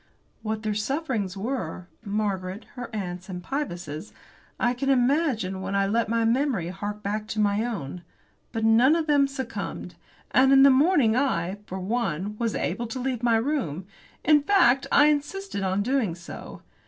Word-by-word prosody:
What 215 0 -3
their 215 -1 0
sufferings 215 - -2
were 195 -6 -4 0.2
Margaret's, 200 -2 -2
her 245 -2 -7
aunt's, 185 -3 -5
and 180 -1 -6
Pybus's 175 - -4 0.5
I 245 - +2
can 270 +2 -2
imagine 250 - +1
when 190 +1 -3
I 195 0 +3
let 225 +3 0
memory 230 - +1
hark 205 +3 -5
back 210 +1 -2
to 220 -1 -4
my 205 +1 +2
own. 180 - -4 0.5
But 225 -1 -1
none 240 +7 +5
of 330 -2 0
them 290 -2 +4
succumbed. 265 -2 -5 0.4
And 265 +1 +5
in 270 0 +7
the 275 - +8
morning 270 -5 +4
I, 200 -8 0
for 190 - -5
one, 200 -2 -2
was 230 -2 -1
able 230 +7 -2
to 230 +3 -5
leave 255 -2 -2
my 235 -2 +3
room; 225 - -2 0.4
in 295 0 +6
fact, 285 -7 +4
I 290 - +6
insisted 300 - -1
on 190 +1 0
doing 240 -7 0
so. 170 0 -10
225 Hz, 165 wpm, -26 LUFS, 195-270 Hz, 0.5 s, the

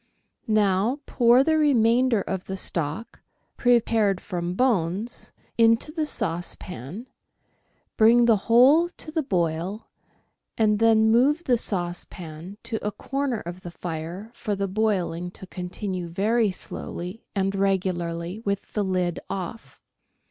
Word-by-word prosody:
Now 210 +3 +2
pour 240 +1 +4
the 315 +1 +2
remainder 245 -4 +3
of 190 -1 -4
the 190 - -5
stock, 170 +6 -3 0.3
prepared 225 -5 +2
from 175 -2 -4
bones, 210 -2 0 0.3
into 230 +5 +4
the 310 -1 -2
saucepan, 175 - -4 0.9
bring 235 +2 +6
the 230 -2 +5
whole 275 +9 +6
to 310 - -8
the 320 0 0
boil, 180 - -2 0.7
and 210 -2 +3
then 220 -1 +5
move 280 +8 +3
the 255 -7 +3
saucepan 175 -3 -4
to 230 -1 -3
a 210 - -1
corner 270 +3 -2
of 175 +2 -8
the 175 - -7
fire 170 +5 -6
for 210 -3 -3
the 200 0 -1
boiling 185 -4 -1
to - - -9
continue 185 0 -5
very 210 +6 +1
slowly 180 +2 -6
and 195 0 0
regularly 185 -2 -1
with 200 -3 -3
the 210 - 0
lid 180 -2 -1
off. 195 +4 -6
205 Hz, 125 wpm, -25 LUFS, 180-230 Hz, 0.9 s, bring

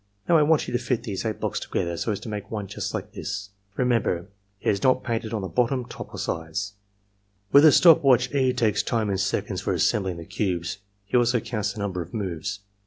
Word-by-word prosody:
Now^ 170 - +4
I - - +4
want 150 0 +3
you - - -4
to 120 - +1
fit 120 -1 -1
these 105 -3 -4
eight 110 -1 -2
blocks - - -2
together 85 0 -2
so 110 - -1
as 100 - -2
to - - -8
make 105 -2 -5
one 105 -2 -4
just - - -4
like - - -5
this. 100 0 -5 0.3
Remember, 115 -8 +1 0.3
it - - +1
is 100 - -2
not 130 -1 +3
painted 115 -2 -2
on 110 -4 -2
the - - -2
bottom 125 +7 0
^ - - -19
top, - - -8
or - - -8
sides 90 +6 -3
J^ 100 0 -39
With 145 +2 +8
a 155 - +9
stop 165 -1 +7
watch 130 -1 +4
E. 130 -2 +3
takes 115 -5 +1
time 110 -3 -1
in 95 - -1
seconds 95 +1 -1
for - - -1
assembling 95 -4 +1
the 85 - -8
cubes. 90 -2 -2 0.3
He 100 - -3
also 120 0 +3
counts 105 -2 -3
the 105 - -9
number 95 -3 -2
of 85 +6 -8
moves. 100 0 -3
105 Hz, 240 wpm, -25 LUFS, 100-120 Hz, 0.3 s, a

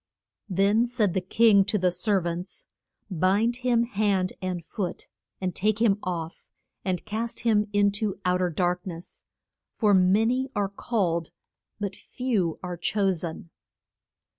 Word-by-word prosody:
Then 200 +5 +3
said 225 -7 +1
the 190 - 0
king 200 +2 +5
to 210 +1 0
the 180 -2 +2
ser 200 +2 +1
vants, 175 +2 -5 0.5
Bind 200 +7 +2
him 245 -2 +2
hand 200 -5 0
and 180 -3 -3
foot 185 -1 -4 0.3
and 185 -2 -2
take 215 +2 +1
him 210 -3 +3
off, 170 -2 -4 0.4
and 185 -2 -2
cast 220 +2 -3
him 215 -2 +2
in 205 0 +3
to 205 -1 -3
out 180 0 +2
er 180 - +2
dark 180 +2 -1
ness. 170 0 -9 0.5
For 210 -3 +3
ma 190 +3 +4
ny 255 +3 +1
are 200 -1 0
called 185 -6 -1 0.5
but 200 -2 -3
few 215 -12 -2
are 180 -1 -4
cho 195 +3 +1
sen. 170 -1 -6
195 Hz, 150 wpm, -26 LUFS, 180-215 Hz, 0.5 s, king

